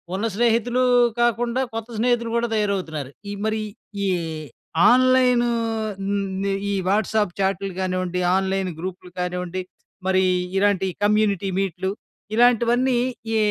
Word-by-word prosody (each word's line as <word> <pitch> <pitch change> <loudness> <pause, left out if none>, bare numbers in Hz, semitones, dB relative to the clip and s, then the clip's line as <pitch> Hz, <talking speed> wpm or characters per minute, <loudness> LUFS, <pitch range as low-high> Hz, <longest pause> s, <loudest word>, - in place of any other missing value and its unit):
ఉన్న 200 +4 -1
స్నేహితులు 235 +2 +2 0.4
కాకుండా, 240 +1 +1
కొత్త 225 +1 -5
స్నేహితులు 235 -1 +1
కూడా 235 - +1
తయారవుతున్నారు. 185 -10 -2 0.2
ఈ - - -3
మరీ 220 0 0 0.4
ఈ - - +1 0.8
ఆన్‌లైను 250 -1 +4 0.6
మ్ 195 -1 -1 0.2
ఈ - - 0 0.2
వాట్సాప్ 210 -1 +1
చాట్‌లు 195 0 0
కానివ్వండి, 185 -1 -1 0.2
ఆన్‌లైన్ 190 0 0
గ్రూప్‌లు 180 +1 -6
కానివ్వండి, 180 0 -3 0.5
మరీ 190 0 +3 0.3
ఇలాంటి 195 -1 +2 0.2
కమ్యూనిటీ 205 -2 +2
మీట్‌లు, 190 -1 -2 0.5
ఇలాంటివన్నీ 245 +2 +3 0.4
ఈ - - +3
205 Hz, 110 wpm, -23 LUFS, 190-235 Hz, 0.8 s, ఆన్‌లైను